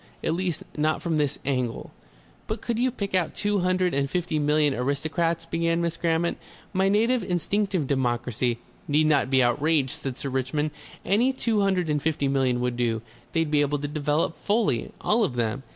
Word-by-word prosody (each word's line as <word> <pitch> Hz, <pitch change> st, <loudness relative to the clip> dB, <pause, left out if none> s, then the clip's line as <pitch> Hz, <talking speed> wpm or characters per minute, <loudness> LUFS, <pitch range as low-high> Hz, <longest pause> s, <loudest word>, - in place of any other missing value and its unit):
At 160 Hz, -, +1 dB
least, 175 Hz, -2 st, -2 dB
not 155 Hz, +1 st, +1 dB
from 165 Hz, -2 st, -1 dB
this 145 Hz, -3 st, 0 dB
angle." 125 Hz, -4 st, -2 dB, 0.6 s
"But 220 Hz, +1 st, -3 dB
could 230 Hz, 0 st, -2 dB
you 255 Hz, +1 st, +3 dB
pick 200 Hz, -6 st, -5 dB
out 180 Hz, -4 st, +1 dB
two 205 Hz, -1 st, +1 dB
hundred 185 Hz, 0 st, +1 dB
and 140 Hz, 0 st, 0 dB
fifty 170 Hz, -1 st, -1 dB
million 150 Hz, -1 st, +3 dB
aristocrats?" 155 Hz, +6 st, -1 dB
began 165 Hz, 0 st, 0 dB
Miss 170 Hz, -1 st, -1 dB
Grammont. 170 Hz, 0 st, 0 dB, 0.3 s
"My 190 Hz, 0 st, +2 dB
native 230 Hz, +5 st, +3 dB
instinctive 185 Hz, -1 st, 0 dB
democracy 125 Hz, -2 st, 0 dB, 0.2 s
" -, -, -30 dB
"Need 150 Hz, +2 st, +3 dB
not 145 Hz, -4 st, +3 dB
be 130 Hz, -1 st, +4 dB
outraged," 140 Hz, +2 st, +2 dB
said 135 Hz, -2 st, -5 dB
Sir 140 Hz, -, -2 dB
Richmond. 135 Hz, +4 st, -1 dB, 0.3 s
"Any 225 Hz, +8 st, +3 dB
two 230 Hz, -5 st, 0 dB
hundred 190 Hz, -3 st, +1 dB
and 150 Hz, -1 st, 0 dB
fifty 150 Hz, -2 st, 0 dB
million 130 Hz, -3 st, +1 dB
would 125 Hz, -1 st, -1 dB
do, 115 Hz, -2 st, 0 dB, 0.3 s
They'd 165 Hz, -2 st, +1 dB
be 150 Hz, -1 st, +4 dB
able 145 Hz, 0 st, +1 dB
to 145 Hz, +1 st, -3 dB
develop 150 Hz, +2 st, -1 dB
fully, 205 Hz, -, +1 dB
all 220 Hz, +2 st, +2 dB
of 160 Hz, -12 st, -1 dB
them. 120 Hz, +2 st, -1 dB
155 Hz, 185 wpm, -26 LUFS, 135-180 Hz, 0.6 s, be